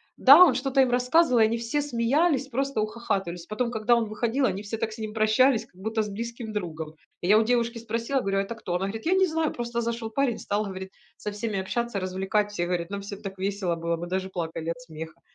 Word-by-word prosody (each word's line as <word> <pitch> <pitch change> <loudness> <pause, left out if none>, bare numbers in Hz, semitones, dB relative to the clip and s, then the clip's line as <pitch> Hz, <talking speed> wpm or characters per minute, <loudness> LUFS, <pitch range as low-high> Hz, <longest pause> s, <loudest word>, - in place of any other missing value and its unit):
Да, 285 +7 +9
он 300 -9 +5
что-то 270 +1 +2
им 260 - +3
рассказывал, 250 +2 +3
и - - +8
они 230 +1 +1
все 235 +5 -1
смеялись, 275 +2 +1
просто 270 -2 -1
ухахатывались. 195 -6 -3
Потом, 235 +4 -2
когда 235 +1 +2
он 235 - +1
выходил, 235 +5 0
они 195 -1 -1
все 215 +2 -4
так 225 0 -1
с 215 - -9
ним 215 -1 -5
прощались, 220 +3 +3
как - - -32
будто 220 +3 -1
с 210 - -3
близким 230 +1 -6
другом. 160 -6 -5 0.3
И 175 - -2
я 210 +3 +6
у 225 - +4
девушки 235 0 +1
спросила, 230 +4 -1
говорю: 195 -2 0
"А - - +3
это 200 +4 -5
кто?" 185 -5 -5
Она 190 +2 0
говорит, 220 +2 -6
я 345 - +3
не 380 0 +4
знаю, 320 -1 0
просто 235 0 -3
зашёл 230 -1 -3
парень, 255 0 0
стал, 205 +1 -1
говорит, 190 -1 -7 0.3
со 210 - -5
всеми 205 -1 -3
общаться, 235 +2 -2
развлекать. 190 +3 -1
Все 175 -4 -2
говорят: 175 -1 -2
"Нам 200 0 -4
всем 200 +1 -8
так 195 -2 -7
весело 190 -2 -1
было, 170 0 -1
мы 175 +1 -6
даже 190 +1 -2
плакали 165 -2 -4
от 165 0 -7
смеха". 160 -1 -9
220 Hz, 240 wpm, -26 LUFS, 190-240 Hz, 0.3 s, Да